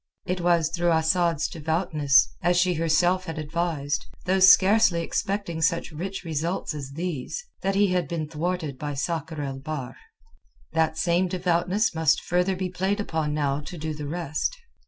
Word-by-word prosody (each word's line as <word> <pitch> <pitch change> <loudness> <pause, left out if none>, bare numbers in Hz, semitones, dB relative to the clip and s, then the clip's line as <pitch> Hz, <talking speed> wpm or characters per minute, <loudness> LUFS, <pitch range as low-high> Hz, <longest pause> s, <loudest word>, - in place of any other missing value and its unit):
It 180 0 -2
was 170 -2 +3
through 175 0 +1
Asad's 160 0 +2
devoutness—as 160 +1 +1
she 180 0 +3
herself 175 +3 +2
had 165 -2 -6
advised, 155 -2 -2 0.2
though 190 +1 +2
scarcely 190 -1 +6
expecting 195 -3 -2
such 170 +1 +1
rich 190 +6 -5
results 165 +1 -2
as 140 -2 -7
these—that 180 - -4
he 200 0 +4
had 180 -4 0
been 155 -1 -3
thwarted 160 -2 -3
by 145 -1 -4
Sakr 160 +1 -3
el 135 -1 -4
Bahr. 145 -3 -5 0.8
That 160 -1 +1
same 175 +2 +2
devoutness 180 +4 +1
must 160 -1 +3
further 180 +2 +1
be 185 0 -3
played 190 +3 -1
upon 160 -6 -2
now 140 -2 0
to 160 +4 -8
do 155 0 -4
the 150 -1 -6
rest. 165 - -2
170 Hz, 155 wpm, -25 LUFS, 155-180 Hz, 0.8 s, scarcely